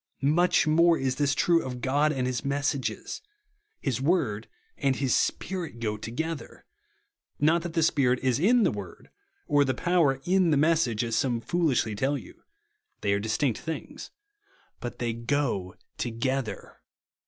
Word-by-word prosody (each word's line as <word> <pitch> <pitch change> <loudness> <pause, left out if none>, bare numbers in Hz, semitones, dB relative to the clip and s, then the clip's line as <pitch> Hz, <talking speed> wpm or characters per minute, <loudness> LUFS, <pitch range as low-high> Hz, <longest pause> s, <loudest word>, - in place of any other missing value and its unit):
Much 175 +1 +3
more 165 +2 +4
is 130 -1 -1
this 140 -2 +1
true 170 +2 +3
of 125 -1 -5
God 145 +4 +2
and 130 -4 -1
his 125 -1 -2
messages. 140 -1 -2 0.6
His 130 -3 -1
word 135 - 0 0.3
and 135 -1 +1
his 135 -2 0
Spirit 175 -9 -2
go 110 -2 -1
together. 145 +9 -5 0.7
Not 160 +3 +3
that 170 -1 -6
the 165 -2 +2
Spirit 130 -5 +3
is 130 -1 +2
in 230 +7 +4
the - - +3
word, - - -9 0.3
or 145 -1 +3
the 130 -2 -1
power 160 -5 +2
in 185 +1 +3
the 150 - +3
message, 150 -7 +2
as 115 -1 -2
some 120 0 +1
foolishly 135 -6 0
tell 135 +7 0
you. - - -13 0.6
They 100 -1 +1
are 100 - +1
distinct 110 +4 0
things; 160 0 -6 0.7
but 120 - -6
they 120 -2 -2
go 115 -6 -1 0.2
together. 120 -1 -3
135 Hz, 155 wpm, -27 LUFS, 120-160 Hz, 0.7 s, more